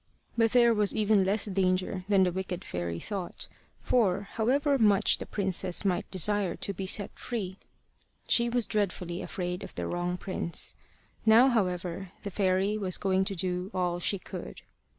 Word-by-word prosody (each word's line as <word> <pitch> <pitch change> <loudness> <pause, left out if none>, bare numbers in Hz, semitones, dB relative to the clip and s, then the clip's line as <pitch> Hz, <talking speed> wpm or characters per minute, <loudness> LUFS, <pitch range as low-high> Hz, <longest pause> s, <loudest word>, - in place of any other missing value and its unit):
But 225 0 +2
there 240 -2 +6
was 210 -2 +1
even 210 -2 +3
less 200 +3 +1
danger 185 -1 0
than 195 -2 +5
the 180 - +2
wicked 185 0 -4
fairy 85 -1 -3
thought; 190 - -4 0.3
for, 200 -6 +2
however 275 +5 +2
much 210 -2 +4
the - - -6
princess 190 -1 0
might 185 -2 0
desire 195 0 0
to 200 - -3
be 190 +1 -5
set 200 +1 +2
free, 195 -6 -5 0.7
she 235 0 +3
was 240 -1 +1
dreadfully 185 -4 -2
afraid 180 -2 -4
of - - -10
the - - -3
wrong 175 0 -2
prince. 180 -3 -4 0.5
Now, 230 +4 +7
however, 180 -4 -1
the 200 - -4
fairy 195 +2 +1
was 185 -3 +1
going 190 -1 +1
to 195 - -3
do 180 +1 -2
all 175 -1 0
she 200 +3 0
could. - - -8
190 Hz, 165 wpm, -29 LUFS, 180-210 Hz, 0.7 s, Now